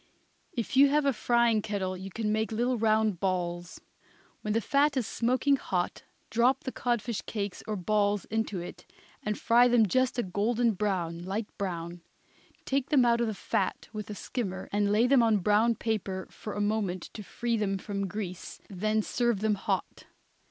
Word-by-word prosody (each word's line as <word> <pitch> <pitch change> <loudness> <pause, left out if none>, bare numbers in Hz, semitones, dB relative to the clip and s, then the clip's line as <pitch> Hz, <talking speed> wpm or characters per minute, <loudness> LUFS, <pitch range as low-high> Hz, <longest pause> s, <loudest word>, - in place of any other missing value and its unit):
If 235 0 -3
you 275 +1 +7
have 295 +1 +2
a 275 - +3
frying 235 -1 +2
kettle 190 -3 -2
you 190 +1 -7
can 210 +2 -2
make 220 +1 0
little 240 +3 +1
round 220 -4 +2
balls. 175 -2 -2 0.6
When 210 - -1
the - - +4
fat 280 +5 +2
is 250 - +1
smoking 255 +5 +1
hot 180 -7 -2 0.3
drop 245 +4 +3
the 260 - -3
codfish 240 -3 -1
cakes 200 -3 -4
or 215 - -1
balls 205 +1 +1
into 220 -3 -2
it 175 - -9 0.3
and 210 0 -2
fry 240 +2 +5
them 240 -2 +5
just 255 +5 +1
a 240 - +1
golden 225 +5 +1
brown, 180 -5 -2
light 205 +4 -4
brown. 175 -3 -4 0.6
Take 275 0 0
them 270 -5 +5
out 235 0 +3
of 235 - +1
the 215 - -3
fat - - -2
with 215 -1 -6
a 210 - -5
skimmer 195 -5 -4
and 205 0 +1
lay 215 +3 +4
them 260 0 +5
on 225 -2 +4
brown 210 +4 +3
paper 195 -5 -2
for 210 - -7
a 205 - -2
moment 205 -4 -1
to 215 - -7
free 235 +3 -2
them 200 -3 0
from 200 0 -3
grease, 185 -2 -6
then 215 +3 0
serve 240 -4 0
them 220 0 +2
hot. 200 - -3
215 Hz, 180 wpm, -29 LUFS, 195-235 Hz, 0.6 s, you